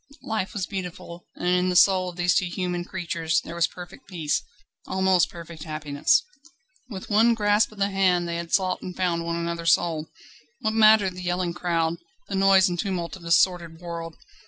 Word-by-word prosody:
Life 215 -4 -3
was 195 -3 -1
beautiful, 180 -3 -7
and 175 - -4
in 180 0 +2
the 180 - -1
soul 185 0 +5
of 175 - -10
these 175 0 +2
two 180 0 +1
human 175 0 -3
creatures 170 -3 -1
there 165 - -9
was 170 -3 +2
perfect 180 +3 -12
peace, 165 -6 -1 0.5
almost 190 -1 +2
perfect 170 -2 -10
happiness. 150 -2 +1 0.7
With 195 -2 -8
one 230 +3 +4
grasp 210 0 +2
of 215 - -15
the 200 0 0
hand 180 -3 +2
they 170 0 -3
had 170 0 -6
sought 185 -2 +1
and 180 - -8
found 175 -2 0
one 170 0 -2
another's 170 -1 +1
soul. 160 -2 -1 0.5
What 220 -2 0
mattered 215 -3 +5
the 180 - -8
yelling 175 -1 -1
crowd, 170 -2 -1 0.3
the - - -7
noise 195 -1 +5
and 175 -1 -3
tumult 175 -5 -3
of 190 - -13
this 170 0 +4
sordid 170 -3 0
world? 170 -2 -7
180 Hz, 190 wpm, -25 LUFS, 170-190 Hz, 0.7 s, soul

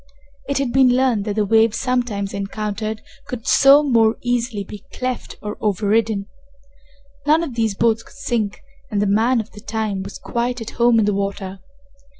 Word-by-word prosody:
It 280 - 0
had 270 -3 -1
been 255 -2 +5
learned 250 -6 +2
that 205 -2 -2
the 215 -1 +1
waves 225 +1 +3
sometimes 240 -6 -1
encountered 210 +2 -4 0.2
could 245 -1 -6
so 280 +2 +6
more 230 -5 +3
easily 240 -3 -1
be 205 +1 -10
cleft 255 -1 -4
or 210 0 -5
overridden. 210 0 +1 1.0
None 315 +3 +4
of 295 -7 -5
these 225 -3 0
boats 225 +1 +2
could - - -18
sink, 230 -7 -2 0.3
and 205 - -1
the 205 - +2
man 225 +5 +3
of 220 0 -5
the 210 - -12
time 215 -3 -2
was 195 +1 -7
quite 245 +1 -2
at 225 - -6
home 235 -1 +5
in 220 - +3
the 210 - +1
water. 195 -1 -3
220 Hz, 175 wpm, -20 LUFS, 205-245 Hz, 1.0 s, so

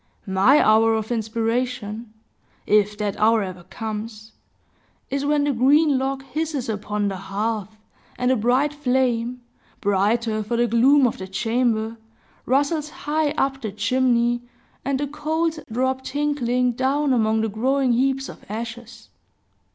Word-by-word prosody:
My 195 +10 +4
hour 225 +1 +4
of 220 +1 -3
inspiration 230 0 -2 0.5
if 210 0 +2
that 210 -2 -2
hour 220 0 +4
ever 185 -2 -7
comes 220 +1 -6 0.8
is 275 +1 -1
when 295 -1 +2
the 290 - +1
green 280 +3 +4
log 270 0 -2
hisses 290 0 -3
upon 210 -1 -2
the 195 -1 -3
hearth, 210 +2 -3 0.4
and 250 +1 +1
the - - +4
bright 255 +6 +2
flame, 250 -3 0 0.4
brighter 215 +3 +1
for 235 +3 -2
the 240 - +3
gloom 260 +5 +4
of 240 - -1
the 190 - -6
chamber, 225 +2 0 0.5
rustles 290 +4 +1
high 300 +1 -1
up 270 0 0
the 220 -4 -4
chimney, 240 +3 +1 0.4
and 270 0 -1
the 290 - 0
coals 315 +3 -2
drop 260 +3 -1
tinkling 260 -4 0
down 270 +3 +1
among 220 -2 +2
the 225 - 0
growing 255 +4 +1
heaps 270 +2 +1
of - - -11
ashes. 230 +2 -7
240 Hz, 140 wpm, -23 LUFS, 220-270 Hz, 0.8 s, My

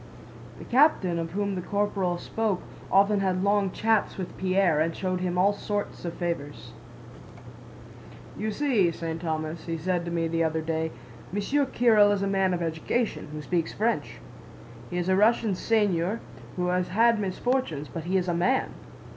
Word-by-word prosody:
(The - - -10
captain 240 - +3
of 165 0 -4
whom 200 0 -1
the 185 - -3
corporal 195 -2 -1
spoke 210 0 -2 0.3
often 200 +1 +4
had 185 -1 0
long 200 -1 +2
chats 220 +2 +1
with 185 -2 -5
Pierre 185 -4 +2
and 160 +1 0
showed 185 -1 -2
him 180 -1 -1
all 195 +3 +4
sorts 205 -2 -4
of 170 - -4
favors.) 145 -9 -4 1.6
"'You 215 - -2
see, 225 -7 +2
St. 165 0 -5
Thomas,' 160 0 -3
he 165 0 -2
said 175 +1 -1
to - - -3
me 165 -1 0
the 165 0 0
other 160 0 0
day. 160 0 -1 0.4
'Monsieur 270 +9 0
Kiril 220 -5 +4
is 200 -1 0
a - - 0
man 195 -1 +2
of 175 - -3
education, 165 +7 -2
who 150 0 -6
speaks 170 +1 -1
French. 225 +3 -1 0.7
He 180 - -4
is 175 0 -1
a 190 - +3
Russian 215 +1 +3
seigneur 200 -1 +1 0.4
who 180 -1 -1
has 180 0 +1
had 230 +3 +3
misfortunes, 195 - -1
but 165 -2 -7
he 185 +2 +1
is 185 -1 -1
a 175 - +1
man. 240 +11 +1
185 Hz, 170 wpm, -27 LUFS, 170-205 Hz, 1.6 s, often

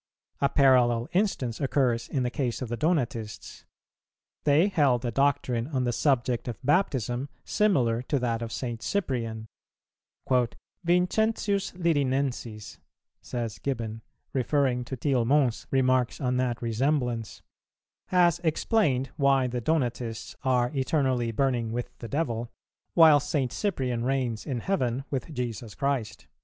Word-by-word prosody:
A 140 - +2
parallel 125 -4 +4
instance 175 - 0
occurs 130 -4 +1
in 130 - 0
the 125 - -1
case 130 -2 -2
of 120 - -6
the 120 - -2
Donatists. 125 -8 -2 0.8
They 150 +6 +5
held 135 - +2
a 120 - -1
doctrine 130 -2 +1
on 135 -4 -1
the 120 -1 0
subject 125 -3 +1
of 120 - -4
Baptism 135 - +1 0.2
similar 125 - +2
to 140 +3 -1
that 120 -3 -1
of 115 -1 -4
St. 120 -1 -4
Cyprian: 115 - -2 1.4
"Vincentius 200 +3 +1
Lirinensis," 135 - -1 0.4
says 115 -4 -4
Gibbon, 115 -5 -3 0.3
referring 130 -2 +1
to 130 - -5
Tillemont's 130 -1 +1
remarks 130 -2 +2
on 125 -1 0
that 125 -2 -1
resemblance, 120 -1 -1 0.6
"has 175 -3 +3
explained 155 - +1
why 140 -2 +3
the 125 -1 -2
Donatists 120 -6 -2
are 125 -2 +2
eternally 130 -4 +1
burning 120 -1 0
with 120 +1 -4
the 115 - -6
devil, 120 -6 -2 0.5
while 160 -3 +8
St. 135 -3 -1
Cyprian 130 - -1
reigns 125 -4 -1
in 125 -5 -2
heaven 130 - -1
with 140 +3 -3
Jesus 120 -5 -5
Christ." 140 -6 -2
130 Hz, 125 wpm, -27 LUFS, 120-145 Hz, 1.4 s, while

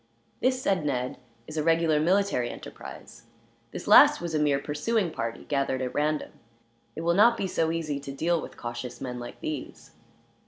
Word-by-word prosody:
"This," 255 0 +1
said 190 -9 +1
Ned, 130 -3 -2 0.3
"is 155 +4 -8
a 155 - +1
regular 165 -1 +3
military 175 -7 +2
enterprise. - - -10 0.4
The - - -7
last - - +8
was 170 -1 -4
a 155 - +1
mere 145 -2 +3
pursuing 165 +7 -1
party, 115 -5 -4
gathered 140 -2 0
at 130 -1 -3
random. 150 +1 0 0.6
It - - -5
will 170 +1 +2
not 230 +5 +5
be 195 - -1
so 165 -3 0
easy 160 -3 -2
to 140 0 -7
deal 165 +4 0
with - - -10
cautious 120 +1 -6
men, 125 -2 -5
like 120 - -9
these." 150 -4 -6
155 Hz, 175 wpm, -27 LUFS, 135-170 Hz, 0.6 s, last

